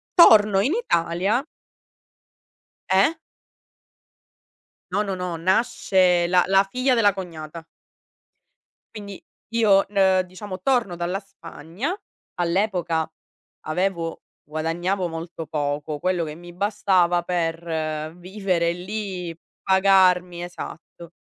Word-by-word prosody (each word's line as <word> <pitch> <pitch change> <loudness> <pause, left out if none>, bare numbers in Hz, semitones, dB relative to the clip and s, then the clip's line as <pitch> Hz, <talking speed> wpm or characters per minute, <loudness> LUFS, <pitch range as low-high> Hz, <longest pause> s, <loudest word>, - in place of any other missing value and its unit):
torno 210 - +7
in 265 +9 +1
Italia. 195 - 0 1.5
Eh? 195 +11 +4 1.8
No, 205 +3 +1
no, 195 - -2
no, 180 -2 -4
nasce 185 -1 +2
la 180 0 +4
la 195 0 +4
figlia 255 +2 +1
della 205 -4 +4
cognata. 165 -3 -8 1.3
Quindi 200 -2 -9 0.3
io, 205 -4 +4
n 205 - -19
uhm, 190 -1 +5
diciamo, 185 +1 -8
torno 240 -7 +1
dalla 175 +3 -2
Spagna, 185 - -6 0.4
all'epoca 175 -3 0 0.6
avevo 170 0 -2 0.2
guadagnavo 170 +5 -2
molto 165 0 -7
poco, 145 0 -2
quello 180 0 0
che 150 -1 -7
mi 175 +1 -12
bastava 185 -3 +2
per 165 -2 -2
vivere 180 -2 -1
lì, 180 -2 -5 0.3
pagarmi 185 -2 +3
esatto. 170 -1 -9
180 Hz, 100 wpm, -23 LUFS, 170-195 Hz, 1.8 s, torno